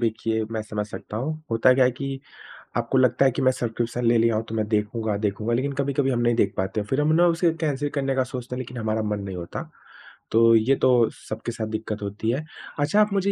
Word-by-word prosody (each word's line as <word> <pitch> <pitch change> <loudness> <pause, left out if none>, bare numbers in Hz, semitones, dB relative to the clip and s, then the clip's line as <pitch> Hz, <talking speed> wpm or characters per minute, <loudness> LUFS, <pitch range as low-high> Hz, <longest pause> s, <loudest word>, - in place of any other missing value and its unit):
देखिए, 110 -1 0
मैं 110 - -2
समझ 105 -1 -4
सकता 105 0 -8
हूँ। 155 +7 -3
होता 115 +3 +5
क्या 130 0 +4
है 125 - +4
कि 135 +1 -5 0.6
आपको 120 +3 0
लगता 130 +1 +4
है 130 - +5
कि 135 - -3
मैं 130 -1 +4
सब्सक्रिप्शन 120 0 -2
ले 115 0 +4
लिया 115 0 +3
हो 110 - +1
तो 110 - -4
मैं 110 -1 0
देखूँगा, 105 0 -1
देखूँगा 105 +2 -1
लेकिन 135 +4 0
कभी-कभी 140 0 0
हम 120 - 0
नहीं 120 0 +2
देख 100 -4 +2
पाते 95 +3 -1
हैं, 105 - -4
फिर 135 +6 +1
हम 155 +1 +2
ना 170 +2 +5
उसे 170 0 +2
कैन्सल 145 -2 0
करने 135 -1 0
का 130 - +2
सोचते 125 -1 -6
हैं 125 - -5
लेकिन 125 0 -7
हमारा 110 -1 -1
मन 105 -1 -2
नहीं 100 -2 -6
होता, 85 -1 -6 0.6
तो 115 +1 +6
ये 115 +5 +4
तो 125 -4 +4
सबके 110 +2 -6
साथ 110 -1 -4
दिक्कत 110 0 -4
होती 100 +2 -3
है। 135 +6 -2 0.4
अच्छा, 155 +9 +3
आप 210 -1 +2
मुझे 200 0 +1
120 Hz, 245 wpm, -24 LUFS, 110-135 Hz, 0.6 s, तो